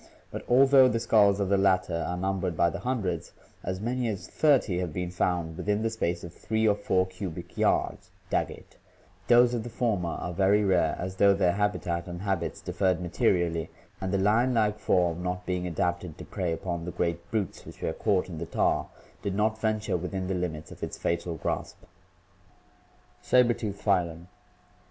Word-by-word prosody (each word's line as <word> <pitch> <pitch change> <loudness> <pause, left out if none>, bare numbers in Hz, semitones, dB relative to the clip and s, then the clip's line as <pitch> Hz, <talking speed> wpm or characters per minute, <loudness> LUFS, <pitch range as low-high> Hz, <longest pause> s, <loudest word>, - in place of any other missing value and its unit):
But - - -6
although 135 +1 +7
the 115 -2 0
skulls 105 -3 +4
of 100 - 0
the 100 -1 +3
latter 90 -3 +2
are 90 - -2
numbered 95 -2 -1
by 85 0 +3
the - - -5
hundreds, 105 -10 -2 0.3
as 95 +1 -3
many 120 +3 -1
as 105 -4 -4
thirty 135 - +2
having 90 -4 -3
been 90 0 -3
found 90 -2 -1
within 105 +5 -1
the 115 - 0
space 85 -6 -2
of 85 - -8
three 110 +3 0
or 105 - +5
four 95 -2 +1
cubic 95 -2 -7
yards - - 0 0.2
(Daggett),' - - -3 0.5
those 120 0 +6
of 120 - -1
the 120 - -7
former 110 -7 -1
are 90 +1 -4
very 100 +3 +3
rare, 90 -5 +2
as 95 +1 -5
though 100 0 +5
their 90 -2 +3
habitat 90 -3 -1
and 90 +1 -6
habits 95 -5 -2
differed 95 -3 0
materially, 85 -1 0 0.3
and 95 -1 -2
the 100 - +2
lion 115 +6 +3
like 105 -2 +1
form, 90 -4 +1
not 90 0 -3
being 90 -1 -2
adapted 85 0 -2
to - - -9
prey 90 -3 -2
upon 85 0 -3
the 90 - -4
great 85 0 -2
brutes 105 -5 -2
which - - -12
were 80 - -1
caught 100 -1 +1
in 85 -4 -7
the 85 - -5
tar, - - +1 0.3
did 100 -1 -2
not 110 +1 0
venture 110 -3 0
within 95 +2 -4
the 95 - -2
limits 85 -4 -4
of - - -12
its - - -4
fatal 85 0 -2
grasp. - - -3 1.4
Saber 125 -1 +4
tooth 100 -4 -5
Phylum. 85 -4 0
95 Hz, 185 wpm, -28 LUFS, 85-105 Hz, 1.4 s, although